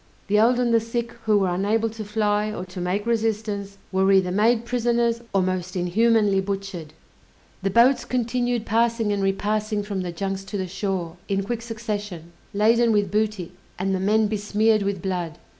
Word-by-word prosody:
The 210 +1 +4
old 240 +3 +4
and 240 -2 +2
the 230 - +5
sick, 230 +1 -3
who 215 -1 +4
were 190 -3 +1
unable 210 +5 +1
to 220 0 -7
fly, 210 0 0
or 185 -3 -5
to 180 0 -8
make 185 +4 -1
resistance, 215 -3 -1
were 190 +1 +3
either 190 -2 +3
made 225 +4 +2
prisoners 235 -1 +1
or 195 -1 +2
most 185 0 -2
inhumanly 205 +2 +2
butchered! 195 -5 -5 0.7
The 195 - 0
boats 240 +4 +4
continued 245 -1 -1
passing 230 -1 +1
and 200 - -1
repassing 210 +2 0
from 200 -2 -3
the 180 -1 -4
junks 195 +2 -3
to 205 - -5
the 190 - -2
shore, 185 -2 -3
in 195 0 0
quick 230 +3 -3
succession, 210 -7 -5 0.2
laden 230 +3 +3
with 205 -3 +1
booty, 210 -4 -1 0.3
and 190 +1 -1
the 190 - 0
men 215 +3 +3
besmeared 215 +1 +1
with 195 -3 -2
blood! 175 -4 -3
205 Hz, 175 wpm, -24 LUFS, 190-225 Hz, 0.7 s, the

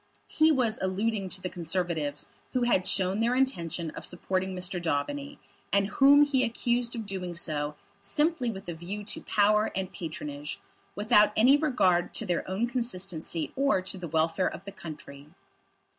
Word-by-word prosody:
He 315 +1 +4
was 245 -6 +1
alluding 195 +1 -1
to 185 +1 -1
the 185 - -2
Conservatives 165 -4 -2 0.3
who 255 - +1
had 190 -6 +2
shown 190 +1 +2
their 235 +2 +2
intention 170 - 0
of - - -9
supporting 185 +1 -2
Mr. 180 0 -2
Daubeny, 280 - -2 0.3
and 200 0 +3
whom 280 +4 +6
he 275 -3 +2
accused 240 0 0
of 225 -2 -4
doing 185 -3 -4
so, 150 -3 0 0.2
simply 295 +5 0
with 195 -4 -7
a 170 - -3
view 180 +6 -6
to 205 - -6
power 210 +1 +2
and 190 -1 -3
patronage, 150 -3 -6 0.4
without 210 0 +4
any 250 +6 +6
regard 220 - +2
to - - -1
their 175 0 -2
own 195 +5 0
consistency 190 -9 -2
or 275 -6 +2
to 190 0 -5
the 175 - -5
welfare 160 +3 +1
of 180 - -9
the 200 - -6
country. 150 -6 -10
190 Hz, 165 wpm, -28 LUFS, 175-235 Hz, 0.4 s, whom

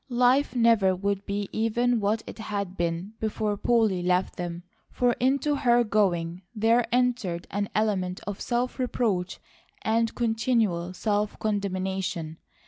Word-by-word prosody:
Life 250 +2 +3
never 225 -6 +4
would 200 +1 -2
be 200 0 -2
even 235 +2 +1
what 215 +2 0
it - - -9
had 200 -3 -4
been 170 +4 -2
before 215 -1 -1
Polly 215 -4 +2
left 180 +1 +1
them, 175 -1 -5 0.3
for 245 -1 +1
into 280 +3 +2
her 240 -3 +4
going 180 -5 0
there 230 +2 +3
entered 240 -8 0
an 205 0 -2
element 190 -4 0
of 205 0 -5
self 245 +2 -1
reproach 215 -7 -1 0.4
and 225 +1 +1
continual 220 -7 0
self 210 +1 -1
condemnation. 190 -5 -2
210 Hz, 135 wpm, -26 LUFS, 185-235 Hz, 0.4 s, never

